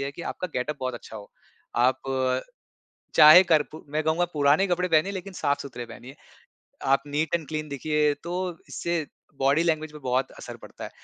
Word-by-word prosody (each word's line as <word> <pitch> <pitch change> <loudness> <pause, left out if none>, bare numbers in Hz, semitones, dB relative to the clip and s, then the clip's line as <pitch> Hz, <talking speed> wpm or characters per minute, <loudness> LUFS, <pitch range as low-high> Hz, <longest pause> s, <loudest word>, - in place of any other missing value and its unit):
है 140 0 -2
कि 170 - -9
आपका 185 - -4
गेटअप 140 +4 -2
बहुत 130 -1 -2
अच्छा 110 -1 -9
हो। 100 -1 -11 0.5
आप, 125 +2 +3 1.1
चाहे 155 +5 +10
करपु 155 -2 +1
मैं 155 +1 0
कहूँगा, 160 +3 +2
पुराने 150 +5 +3
कपड़े 180 0 0
पहनें, 165 +3 +3
लेकिन 190 0 -6
साफ-सुथरे 140 -6 -2
पहनिए, 125 +4 -11 0.7
आप 135 0 +3
नीट 150 +3 -1
एंड 160 -4 -1
क्लीन 155 -1 -4
दिखिए, 150 +1 +1
तो 175 +3 -4
इससे 170 -3 -2 0.3
बॉडी 140 +4 +3
लैंग्वेज 155 -2 0
पे 150 - -9
बहुत 130 -1 -1
असर - - -8
पड़ता - - -11
है। - - -7
150 Hz, 175 wpm, -26 LUFS, 140-170 Hz, 1.1 s, चाहे